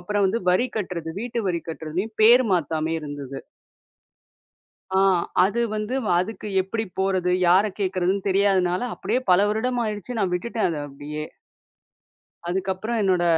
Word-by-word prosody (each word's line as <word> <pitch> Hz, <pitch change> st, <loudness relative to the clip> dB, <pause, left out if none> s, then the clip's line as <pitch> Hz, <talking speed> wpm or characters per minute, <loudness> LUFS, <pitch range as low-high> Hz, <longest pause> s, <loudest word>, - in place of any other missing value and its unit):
அப்புறம் 205 Hz, +3 st, 0 dB
வந்து 220 Hz, +5 st, 0 dB
வரி 185 Hz, +8 st, +3 dB
கட்டுறது 180 Hz, -5 st, -3 dB
வீட்டு 240 Hz, 0 st, -3 dB
வரி 170 Hz, -2 st, -1 dB
கட்டுறதுலயும், 165 Hz, +7 st, -4 dB
பேர் 240 Hz, +4 st, +7 dB
மாத்தாமயே 160 Hz, -1 st, 0 dB
இருந்தது. 145 Hz, -2 st, -6 dB, 1.6 s
அ -, -, +5 dB, 0.5 s
அது 220 Hz, +4 st, 0 dB
வந்து, 215 Hz, +4 st, -2 dB
வ -, -, -2 dB
அதுக்கு 215 Hz, +3 st, -4 dB
எப்புடி 220 Hz, +4 st, -3 dB
போறது? 185 Hz, -2 st, +1 dB, 0.2 s
யார 195 Hz, +4 st, +4 dB
கேட்குறதுன்னு 190 Hz, 0 st, 0 dB
தெரியாதனால, 190 Hz, -1 st, +2 dB
அப்டியே 250 Hz, -, -1 dB
பல 180 Hz, -, +6 dB
வருடம் 240 Hz, +3 st, 0 dB
ஆயிடுச்சு. 215 Hz, +2 st, -4 dB
நா 200 Hz, -, +2 dB
விட்டுட்டேன் 225 Hz, +4 st, -1 dB
அத 165 Hz, -, -3 dB
அப்டியே. 150 Hz, +2 st, -6 dB, 1.2 s
அதுக்கப்புறம் 190 Hz, +5 st, -2 dB
என்னோட 185 Hz, -3 st, +2 dB
190 Hz, 135 wpm, -24 LUFS, 175-215 Hz, 1.6 s, பேர்